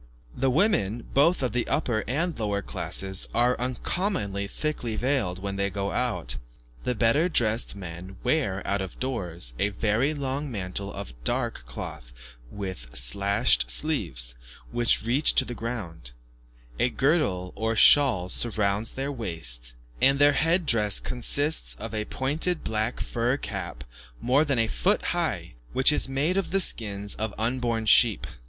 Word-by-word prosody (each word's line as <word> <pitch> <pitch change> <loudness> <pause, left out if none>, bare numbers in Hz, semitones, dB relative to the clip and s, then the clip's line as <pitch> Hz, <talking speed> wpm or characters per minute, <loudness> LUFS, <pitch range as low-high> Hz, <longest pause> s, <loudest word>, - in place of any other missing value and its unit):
The 135 +1 +1
women, 120 - +1
both 145 +3 +3
of 125 - 0
the 120 +2 -1
upper 120 -7 0
and 165 +8 -1
lower 100 -2 -1
classes, 95 -1 -1
are 120 +1 +3
uncommonly 125 - -2
thickly 125 -3 -3
veiled 120 -7 0
when 100 +1 -5
they 100 0 0
go 100 0 -3
out. 120 - -1 0.5
The 125 - 0
better 115 - +3
dressed 115 - +2
men 90 0 -9
wear, 100 -12 0
out 100 0 0
of 95 -2 -7
doors, 90 - -3
a 105 - +2
very 115 +8 0
long 140 0 -3
mantle 100 -1 -4
of - - -7
dark - - -2
cloth - - -8 0.4
with 75 -10 -6
slashed 100 - +3
sleeves, 65 - -1 0.4
which 120 -2 +2
reach 125 +6 +3
to 130 - +5
the 120 - -5
ground; 105 - -6 0.7
a 125 - +3
girdle 125 - 0
or 110 +2 -1
shawl 120 -8 +6
surrounds 105 -1 0
their 135 +2 -3
waist, 75 - -2 0.3
and 135 +1 +5
their 145 0 +5
head 165 +5 +2
dress 105 -6 +3
consists 145 +5 +2
of 115 +1 -7
a 105 -1 -2
pointed 155 +9 0
black 110 +2 -1
fur 120 +3 -1
cap 65 - -5 0.4
more 130 +5 +3
than 140 -4 0
a 115 - +3
foot 110 - 0
high, - - -2 0.2
which 130 +3 +5
is 150 - 0
made 145 +8 0
of 195 - -1
the 195 - +2
skins 100 - 0
of 110 -1 -4
unborn 115 0 -1
sheep. 110 -1 +4
115 Hz, 150 wpm, -26 LUFS, 100-135 Hz, 0.7 s, shawl